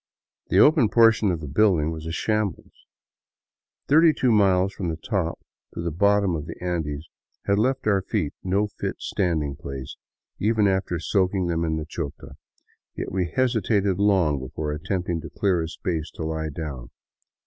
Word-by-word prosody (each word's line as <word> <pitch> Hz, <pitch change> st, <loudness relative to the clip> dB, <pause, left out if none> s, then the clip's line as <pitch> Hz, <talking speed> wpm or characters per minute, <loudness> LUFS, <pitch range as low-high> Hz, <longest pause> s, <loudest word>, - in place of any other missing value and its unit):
The -, -, +1 dB
open 145 Hz, -7 st, +6 dB
portion 115 Hz, -2 st, +5 dB
of 85 Hz, -3 st, -1 dB
the 75 Hz, -, -6 dB
building 80 Hz, -1 st, +2 dB
was 80 Hz, 0 st, -6 dB
a -, -, -3 dB
shambles. 105 Hz, +2 st, -3 dB, 1.0 s
Thirty 160 Hz, +2 st, +6 dB
two 125 Hz, -4 st, +1 dB
miles 95 Hz, -2 st, +3 dB
from 90 Hz, -4 st, -3 dB
the 80 Hz, -, -2 dB
top 85 Hz, -1 st, -2 dB, 0.4 s
to -, -, -3 dB
the 85 Hz, -, -2 dB
bottom 100 Hz, +1 st, +2 dB
of 75 Hz, 0 st, -5 dB
the -, -, -6 dB
Andes 80 Hz, -4 st, -3 dB, 0.4 s
had 100 Hz, +1 st, +2 dB
left 130 Hz, +4 st, 0 dB
our 100 Hz, -3 st, +3 dB
feet 95 Hz, -6 st, -2 dB
no 100 Hz, +3 st, +1 dB
fit 105 Hz, -, -5 dB
standing 80 Hz, -7 st, -1 dB
place, 70 Hz, -2 st, -7 dB, 0.4 s
even 105 Hz, 0 st, +2 dB
after 95 Hz, -2 st, 0 dB
soaking 95 Hz, +2 st, 0 dB
them 85 Hz, -1 st, 0 dB
in 80 Hz, -1 st, 0 dB
the 75 Hz, -, -4 dB
Chota; 80 Hz, -2 st, -6 dB, 0.6 s
yet -, -, -5 dB
we 90 Hz, -2 st, -1 dB
hesitated 105 Hz, -5 st, +1 dB
long 95 Hz, -8 st, +3 dB
before 75 Hz, +4 st, -4 dB
attempting 85 Hz, +2 st, -2 dB
to -, -, -8 dB
clear 95 Hz, -4 st, +1 dB
a 80 Hz, -, -3 dB
space 80 Hz, -3 st, -3 dB
to -, -, -5 dB
lie 80 Hz, 0 st, -2 dB
down. 70 Hz, -6 st, -6 dB
90 Hz, 170 wpm, -24 LUFS, 80-100 Hz, 1.0 s, open